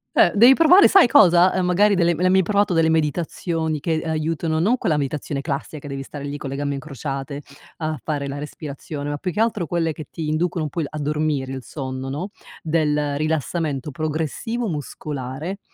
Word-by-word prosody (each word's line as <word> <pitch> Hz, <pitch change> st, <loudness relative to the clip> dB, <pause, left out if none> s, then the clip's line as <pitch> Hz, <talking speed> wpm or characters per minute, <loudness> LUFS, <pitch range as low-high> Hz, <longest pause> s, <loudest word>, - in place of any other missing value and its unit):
Eh, -, -, +5 dB
devi 240 Hz, +6 st, +7 dB
provare, 350 Hz, +5 st, +7 dB
sai 385 Hz, -9 st, +6 dB
cosa? 180 Hz, -4 st, +6 dB
Ehm, 185 Hz, -1 st, 0 dB
magari, 200 Hz, +4 st, +4 dB
delle 170 Hz, -3 st, +2 dB
le 175 Hz, -, -2 dB
hai 185 Hz, -, +4 dB
mai 190 Hz, -, +5 dB
provato 200 Hz, +1 st, +1 dB
delle 165 Hz, -1 st, +3 dB
meditazioni? 160 Hz, 0 st, -1 dB
Che, 165 Hz, +3 st, -1 dB
ehm, 160 Hz, -, -4 dB
aiutano 160 Hz, 0 st, -1 dB
non 205 Hz, +10 st, +3 dB
quella 165 Hz, -10 st, 0 dB
meditazione 140 Hz, 0 st, -3 dB
classica, 145 Hz, +1 st, -4 dB
che 145 Hz, -, -9 dB
devi 135 Hz, -1 st, -5 dB
stare 140 Hz, +1 st, -8 dB
lì, 145 Hz, 0 st, -4 dB
con 140 Hz, -, -6 dB
le 135 Hz, -, -4 dB
gambe 140 Hz, 0 st, -2 dB
incrociate 140 Hz, 0 st, -5 dB, 0.3 s
a 155 Hz, -1 st, -3 dB
fare 145 Hz, -3 st, -2 dB
la 140 Hz, +1 st, -5 dB
respirazione, 145 Hz, 0 st, -6 dB
ma 145 Hz, -, -2 dB
più 180 Hz, +5 st, -3 dB
che 190 Hz, -, -5 dB
altro, 220 Hz, -6 st, +1 dB
quelle 165 Hz, -2 st, 0 dB
che 155 Hz, 0 st, -9 dB
ti 160 Hz, -2 st, -5 dB
inducono 165 Hz, +2 st, 0 dB
un 150 Hz, -, -3 dB
po' 170 Hz, -, -2 dB
il 150 Hz, -, -2 dB
a 155 Hz, -, -7 dB
dormire, 150 Hz, -2 st, -1 dB
il 130 Hz, -, -5 dB
sonno, 130 Hz, -2 st, -5 dB
no, 160 Hz, +9 st, -4 dB, 0.3 s
del 150 Hz, -3 st, 0 dB
rilassamento 155 Hz, -1 st, -2 dB
progressivo 160 Hz, -, -3 dB
muscolare 150 Hz, +2 st, -5 dB
155 Hz, 200 wpm, -22 LUFS, 145-175 Hz, 0.3 s, devi